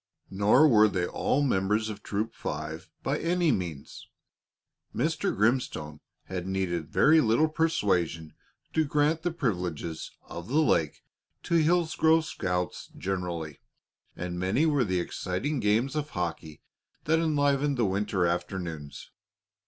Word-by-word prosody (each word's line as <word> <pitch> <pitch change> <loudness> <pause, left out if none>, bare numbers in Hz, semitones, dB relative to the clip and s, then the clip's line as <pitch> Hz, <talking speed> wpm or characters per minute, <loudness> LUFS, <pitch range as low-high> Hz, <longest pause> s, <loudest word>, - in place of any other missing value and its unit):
Nor 105 +10 +5
were 110 -5 +6
they 95 -4 -1
all 140 +9 0
members 105 -3 +1
of 105 -1 -6
Troop 110 +2 -3
Five 80 +4 -5
by 140 +2 0
any 170 -1 +2
means. 85 -6 -5 0.9
Mr. - - 0
Grimstone 105 - 0 0.2
had 90 -1 -5
needed 90 -4 -2
very 155 - +5
little 120 +6 +3
persuasion 95 - 0 0.4
to 160 - +3
grant 150 +2 +1
the 175 - 0
privileges 90 - -3
of 85 +1 -8
the 140 - 0
lake 80 - +1 0.4
to - - -3
Hillsgrove 160 -1 +3
scouts 90 -9 -3
generally, 85 -6 -4 0.6
and 90 0 -4
many 95 - +1
were 145 -5 +3
the 95 -2 0
exciting 95 - -2
games 115 +6 +1
of 150 0 -2
hockey 85 - -5 0.4
that 160 +1 +2
enlivened 145 -3 +1
the 120 - +2
winter 95 -1 0
afternoons. 85 -4 -4
105 Hz, 130 wpm, -28 LUFS, 90-145 Hz, 0.9 s, were